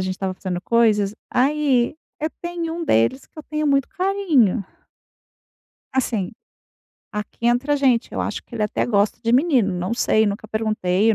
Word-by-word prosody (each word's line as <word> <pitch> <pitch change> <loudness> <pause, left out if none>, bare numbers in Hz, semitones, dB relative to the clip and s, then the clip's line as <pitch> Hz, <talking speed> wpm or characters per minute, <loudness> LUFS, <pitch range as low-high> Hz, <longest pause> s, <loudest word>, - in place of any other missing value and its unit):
gente 185 0 -2
estava 190 0 -3
fazendo 180 -2 -4
coisas. 210 -1 +2 0.2
Aí, 270 -2 +2 0.3
eu 310 - 0
tem 345 -1 -3
um 335 0 -4
deles 115 - +2
que - - -19
eu - - -6
tenho 305 0 -2
muito 275 -1 +2
carinho. 360 - +2 1.3
Assim, 225 -8 0 0.8
aqui 210 +3 -4
entre 245 +4 +1
a 290 - +4
gente, 255 -4 +2
eu - - -2
acho - - -3
que 235 - -10
ele 215 - -1
até 210 - -1
gosta 205 -2 +1
de 230 - +1
menino. 255 - +3
Não 180 +5 -2
sei, 220 -2 +2
nunca 205 +1 -3
perguntei. 215 -1 +1
Eu - - +1
235 Hz, 170 wpm, -22 LUFS, 205-290 Hz, 1.3 s, a